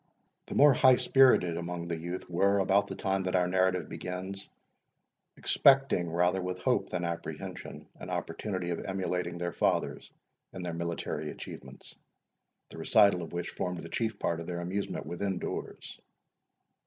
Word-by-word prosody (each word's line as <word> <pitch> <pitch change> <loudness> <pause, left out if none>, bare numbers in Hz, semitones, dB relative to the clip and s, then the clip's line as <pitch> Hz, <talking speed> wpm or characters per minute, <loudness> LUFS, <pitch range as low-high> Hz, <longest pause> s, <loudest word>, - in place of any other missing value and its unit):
The - - -6
more 145 -1 +7
high 130 +1 +6
spirited 125 -12 +4
among 85 0 -4
the 85 - -2
youth 85 +3 -5
were, 100 +3 +2
about 100 +1 +3
the - - -6
time 95 -1 0
that 95 0 -1
our 90 -1 +3
narrative 95 -1 +1
begins, 95 +2 -6 0.9
expecting, 135 -11 +4
rather 90 +2 +2
with 90 0 -3
hope 90 - 0
than 90 - -2
apprehension, 85 0 -6
an - - -8
opportunity 95 -4 -3
of 85 - -2
emulating 90 -2 -2
their 85 -1 -3
fathers - - 0 0.4
in 95 - -6
their 85 -1 -3
military 85 -2 -3
achievements, - - -10 0.8
the - - -9
recital 100 -4 +4
of 85 - -7
which 85 0 -3
formed 90 -1 -4
the 85 - -8
chief 110 +1 -2
part 85 -3 -1
of 85 - -7
their 85 -1 -3
amusement 95 +3 -3
within 95 +2 -2
doors. - - -6
90 Hz, 155 wpm, -30 LUFS, 85-95 Hz, 0.9 s, more